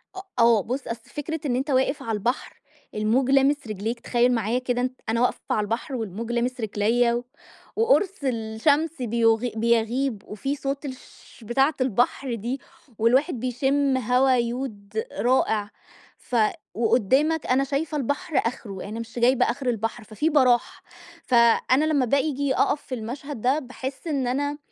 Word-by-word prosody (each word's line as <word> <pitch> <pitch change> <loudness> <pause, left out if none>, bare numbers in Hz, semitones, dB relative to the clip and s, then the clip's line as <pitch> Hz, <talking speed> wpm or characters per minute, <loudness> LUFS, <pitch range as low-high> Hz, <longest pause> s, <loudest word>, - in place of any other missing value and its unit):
أ 380 - -5 0.2
آه 230 -2 +5
بُص، 255 +3 -4
أصلي 230 0 -6
فكرة 315 +2 -4
إن 250 -4 +1
أنت 265 +4 -2
واقف 265 +1 +1
عالبحر 225 +2 -2 0.3
الموج 230 +5 +1
لامس 275 0 +3
رجليك 215 +3 -3
تخيل 240 +1 +2
معايا 230 +1 0
كده 245 -1 -1
أنت 255 0 -3
أنا 230 +1 +1
واقفة 245 - +1
عالبحر، 225 +6 -2
والموج 225 0 -4
لامس 245 +1 -1
رجلَيّا 235 +3 +1 0.5
وقرص 440 -4 +3
الشمس 265 +6 0
بيُغ 230 -1 +3 0.2
بيَغيب 230 +1 +1
وفي 270 +7 -3
صوت 275 +1 -4
الشش 260 -2 -11
بتاعة 270 +7 +2
البحر 250 +1 +1
دي، 240 +5 -4 0.4
والواحد 255 +6 +2
بيشم 270 +3 +1
هوا 255 +2 +3
يود 235 -4 -3 0.2
رائع 220 -3 +2 0.5
ف 250 - -7 0.4
وقدامك 260 +8 +2
أنا 260 +2 +2
شايفة 290 +2 -2
البحر 285 +3 -2
آخره 205 -5 -4
يعني 215 +3 -6
مش 230 +1 -6
جايبة 250 +2 +4
آخر 270 -3 -3
البحر، 225 0 -2
ففي 220 +9 -1
براح 255 -5 +2 0.4
فأنا 245 +3 +4
لما 295 -4 +2
بآجي 280 +1 +1
أقف 290 - +1
في 255 - -5
المشهد 250 +3 -6
ده 260 +6 +2
باحس 265 +2 -7
إن 275 -5 0
أنا 285 +3 -1
250 Hz, 145 wpm, -24 LUFS, 230-275 Hz, 0.5 s, آه